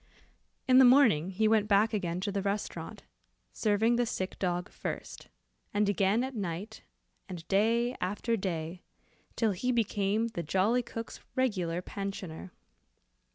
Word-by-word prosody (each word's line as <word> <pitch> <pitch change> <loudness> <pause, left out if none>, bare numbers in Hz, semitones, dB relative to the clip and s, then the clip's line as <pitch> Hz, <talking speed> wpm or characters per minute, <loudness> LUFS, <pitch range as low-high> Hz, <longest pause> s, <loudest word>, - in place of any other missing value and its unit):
In 255 0 +7
the - - +9
morning 245 - +5
he 215 +3 +1
went 215 -1 +3
back 215 +2 +3
again 180 -4 -1
to 200 +1 -2
the 200 0 -1
restaurant, 200 +1 -4 0.5
serving 220 +2 +2
the 240 -1 +1
sick 185 -3 -4
dog 180 -1 -1
first, - - -6 0.5
and 205 0 +3
again 205 +3 +2
at 265 +1 -4
night, 200 +2 -5 0.5
and 170 -3 -8
day 230 +5 +2
after 210 +5 -1
day, 175 -3 -4 0.5
till 225 -2 +2
he 250 +7 -1
became 215 -1 0
the 175 - -4
jolly 195 +9 +2
cook's 230 -1 -7 0.2
regular 185 -10 0
pensioner. 190 -3 -6
205 Hz, 140 wpm, -30 LUFS, 185-230 Hz, 0.5 s, the